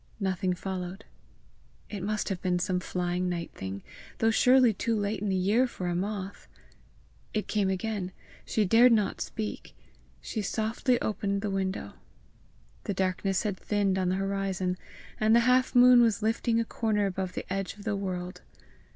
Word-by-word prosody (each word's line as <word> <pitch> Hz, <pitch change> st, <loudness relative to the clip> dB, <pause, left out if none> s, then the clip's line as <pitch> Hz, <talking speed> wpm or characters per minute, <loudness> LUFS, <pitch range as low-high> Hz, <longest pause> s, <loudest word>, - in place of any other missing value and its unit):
Nothing 185 Hz, -2 st, 0 dB
followed. 185 Hz, +2 st, -5 dB, 0.8 s
It 205 Hz, -3 st, -6 dB
must 210 Hz, +3 st, -1 dB
have 190 Hz, -3 st, -3 dB
been 180 Hz, -1 st, +1 dB
some 180 Hz, 0 st, 0 dB
flying 180 Hz, 0 st, -2 dB
night 170 Hz, -1 st, -3 dB
thing, 95 Hz, +1 st, -6 dB, 0.3 s
though 225 Hz, 0 st, +3 dB
surely 250 Hz, +1 st, +5 dB
too 230 Hz, +4 st, -1 dB
late 205 Hz, 0 st, -1 dB
in 210 Hz, -, -1 dB
the 190 Hz, -, +1 dB
year 205 Hz, +8 st, +3 dB
for 185 Hz, -6 st, -5 dB
a 175 Hz, -, 0 dB
moth! 195 Hz, +1 st, -4 dB, 0.9 s
It 215 Hz, -, -1 dB
came 205 Hz, -3 st, +1 dB
again! 190 Hz, -1 st, -2 dB, 0.3 s
She 215 Hz, -, +1 dB
dared 235 Hz, +6 st, +6 dB
not 210 Hz, -3 st, +1 dB
speak. 215 Hz, -1 st, -5 dB, 0.4 s
She 220 Hz, -, -4 dB
softly 225 Hz, +5 st, 0 dB
opened 200 Hz, -1 st, -1 dB
the 205 Hz, -, -1 dB
window. 190 Hz, 0 st, -2 dB, 0.9 s
The 200 Hz, -, -2 dB
darkness 190 Hz, 0 st, 0 dB
had 205 Hz, -4 st, -2 dB
thinned 200 Hz, -2 st, 0 dB
on 185 Hz, -1 st, +1 dB
the 185 Hz, -, +1 dB
horizon, 195 Hz, -2 st, -1 dB, 0.4 s
and 220 Hz, +1 st, +4 dB
the 235 Hz, -, +6 dB
half 255 Hz, +2 st, +3 dB
moon 245 Hz, 0 st, +8 dB
was 225 Hz, -2 st, +2 dB
lifting 225 Hz, +1 st, +1 dB
a 230 Hz, -, 0 dB
corner 215 Hz, -3 st, 0 dB
above 190 Hz, -1 st, -3 dB
the -, -, -5 dB
edge 195 Hz, -1 st, -3 dB
of 205 Hz, -, -12 dB
the 215 Hz, -1 st, -1 dB
world. 185 Hz, -2 st, -4 dB
200 Hz, 170 wpm, -28 LUFS, 185-220 Hz, 0.9 s, moon